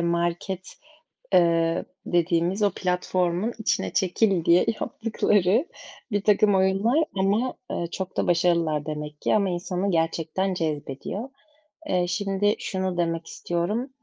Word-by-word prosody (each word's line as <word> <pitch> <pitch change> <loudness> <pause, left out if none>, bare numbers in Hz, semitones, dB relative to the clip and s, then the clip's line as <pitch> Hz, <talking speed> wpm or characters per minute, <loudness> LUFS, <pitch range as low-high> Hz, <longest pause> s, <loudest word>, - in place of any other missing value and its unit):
market, 170 +2 -1 0.6
eee, 170 -1 +3 0.2
dediğimiz 175 +3 +1
o 200 - +3
platformun 180 +3 0
içine 220 - -1
çekil 190 -2 +2
diye 170 +1 +5 0.2
yaptıkları 215 - +1 0.5
birtakım 205 0 +3
oyunlar. 195 +11 +3
Ama, 205 +6 +1 0.2
eee, 170 - -2
çok 190 -1 -5
da - - +1
başarılılar 170 -3 +2
demek 150 -1 -6
ki. - - +2
Ama 200 -3 +2
insanı 180 +2 -2
gerçekten 165 +3 0
cezbediyor. 160 - -4 0.6
Eee, 180 -1 +1
şimdi 195 +3 0
şunu 190 -2 -2
demek 165 -1 -1
istiyorum. 205 +10 -2
180 Hz, 115 wpm, -25 LUFS, 170-200 Hz, 0.6 s, diye